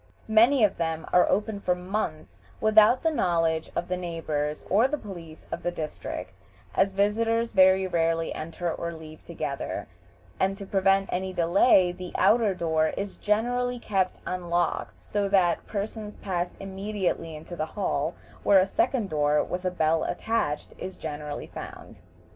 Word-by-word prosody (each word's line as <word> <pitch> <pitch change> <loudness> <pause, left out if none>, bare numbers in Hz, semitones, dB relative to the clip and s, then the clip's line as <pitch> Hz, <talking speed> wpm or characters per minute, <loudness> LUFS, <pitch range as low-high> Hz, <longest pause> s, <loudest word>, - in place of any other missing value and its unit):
Many 235 +3 +6
of 210 - +3
them 165 -1 -2
are 180 - +5
open 205 +1 0
for 180 -2 +1
months 180 -4 -4 0.2
without 215 +3 +5
the 325 - +3
knowledge 165 - +1
of 175 - -1
the 180 - -1
neighbors 155 -4 -3
or 210 +6 +4
of - - +2
the 300 - -1
police 170 - -10
of - - -4
the - - -1
district, 155 -3 -5 0.4
as 195 0 +2
visitors 225 +3 +1
very 190 -1 +5
rarely 165 -2 0
enter 165 +1 -4
or 170 0 -4
leave 155 -1 -11
together, - - -4 0.5
and 195 +1 +1
to 200 - -7
prevent 195 0 +2
any 185 +1 -2
delay 180 +2 +4
the 180 0 -8
outer 220 -4 +4
door 160 -2 +1
is 200 0 -4
generally 245 +4 0
kept 195 -5 -1
unlocked, 175 -1 -1
so 205 -1 -1
that 185 -3 +2
persons 210 0 -5
pass 175 -2 -3
immediately 195 -4 -3
into 160 +3 -8
the 155 -2 -2
hall, 165 -5 -1 0.3
where 200 - +5
a 185 - +6
second 260 - 0
door, 150 -2 +2
with 180 +1 -4
a - - +3
bell 160 -2 +1
attached, 175 -7 -2
is 190 - -6
generally 150 -1 -5
found. - - -10
185 Hz, 160 wpm, -27 LUFS, 165-205 Hz, 0.5 s, Many